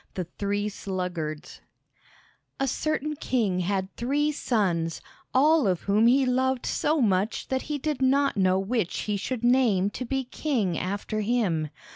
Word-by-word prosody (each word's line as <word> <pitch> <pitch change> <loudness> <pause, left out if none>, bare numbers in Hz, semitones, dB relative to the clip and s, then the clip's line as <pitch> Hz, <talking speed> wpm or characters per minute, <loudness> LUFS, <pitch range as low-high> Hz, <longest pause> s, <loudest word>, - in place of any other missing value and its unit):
The 185 - -2
Three 200 +4 -2
Sluggards 180 -6 -5 1.0
A 270 - +1
certain 305 +3 -1
king 225 -10 0
had 190 +1 -2
three 285 +5 +1
sons, 185 - 0 0.3
all 295 -1 +4
of 180 -3 0
whom 210 +3 +3
he 265 +2 +4
loved 260 0 +1
so 305 +1 +1
much 200 -1 0
that 260 0 0
he 295 - -1
did 290 -1 -3
not 275 +2 +3
know 185 -2 +3
which 195 -1 -1
he 210 - -2
should 230 +4 -3
name 235 -6 +3
to 255 - -5
be 265 +2 -1
king 245 - -1
after 200 +5 -3
him. 200 -9 0
220 Hz, 150 wpm, -26 LUFS, 190-265 Hz, 1.0 s, all